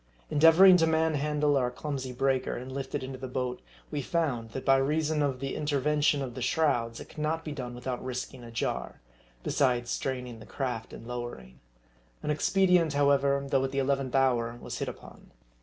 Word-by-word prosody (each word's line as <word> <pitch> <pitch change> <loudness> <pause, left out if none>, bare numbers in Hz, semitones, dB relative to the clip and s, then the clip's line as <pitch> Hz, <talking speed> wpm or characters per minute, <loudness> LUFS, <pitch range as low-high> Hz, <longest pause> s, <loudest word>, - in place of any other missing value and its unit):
Endeavoring 165 +5 +8
to 165 -1 +3
manhandle 150 -2 +1
our 125 -3 +2
clumsy 135 0 -4
breaker, 130 +1 0
and 130 +2 -7
lift 135 0 -5
it - - -2
into 130 0 -6
the 130 - -5
boat, 125 -1 -3 0.3
we 145 - -2
found, 130 -7 -1
that 130 +3 -6
by 135 - +6
reason 150 +3 +1
of 135 -3 0
the 135 0 -3
interven 150 0 0
tion 145 -1 +3
of 125 -2 -5
the 130 - -7
shrouds, 120 -4 +1
it - - -8
could - - -17
not 160 +2 -1
be 155 - -4
done 125 -4 -5
without 125 0 -4
risking 125 -1 -5
a 120 - -9
jar; 115 - -3 0.4
besides 125 -3 +1
straining 125 -3 -3
the 110 - -11
craft 125 -5 -4
in - - -10
lowering. 120 - -7 0.6
An 150 - 0
expedient, 180 0 +3
however, 140 -1 +3
though 135 -1 +2
at 135 - 0
the 135 - -5
eleventh 135 -1 0
hour, 120 -3 +2
was - - -6
hit - - -2
upon. - - -10
135 Hz, 190 wpm, -29 LUFS, 125-150 Hz, 0.6 s, Endeavoring